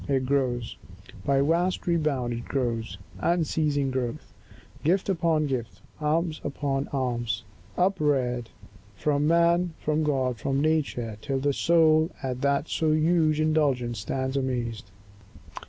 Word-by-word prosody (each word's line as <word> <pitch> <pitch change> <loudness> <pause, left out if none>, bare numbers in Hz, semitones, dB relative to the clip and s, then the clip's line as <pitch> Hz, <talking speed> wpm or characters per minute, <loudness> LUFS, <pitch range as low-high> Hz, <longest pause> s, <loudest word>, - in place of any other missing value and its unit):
It 135 -2 +1
grows— 125 -3 -1 0.5
By 135 -1 +3
vast 170 +5 +1
rebound 150 -8 0
it 120 0 -5
grows, 115 -7 -2 0.2
unceasing 155 -5 +1
growth; 125 -2 -4 0.5
Gift 185 +6 +1
upon 165 -4 +2
gift, 125 -5 -3 0.2
alms 155 +1 0
upon 140 -1 -2
alms, 120 -4 -2 0.3
upreared, 140 - +1 0.5
From 145 0 +1
man, 170 +1 +3
from 155 +1 0
God, 130 -5 0
from 135 +5 0
nature, 140 -8 0
till 135 -2 -2
the 140 +1 +1
soul 160 0 +4
At 130 -1 -3
that 140 +2 +1
so 155 -1 +1
huge 155 -1 +2
indulgence 140 -7 +1
stands 130 +5 -2
amazed. 120 -6 -2
140 Hz, 120 wpm, -26 LUFS, 125-155 Hz, 0.5 s, soul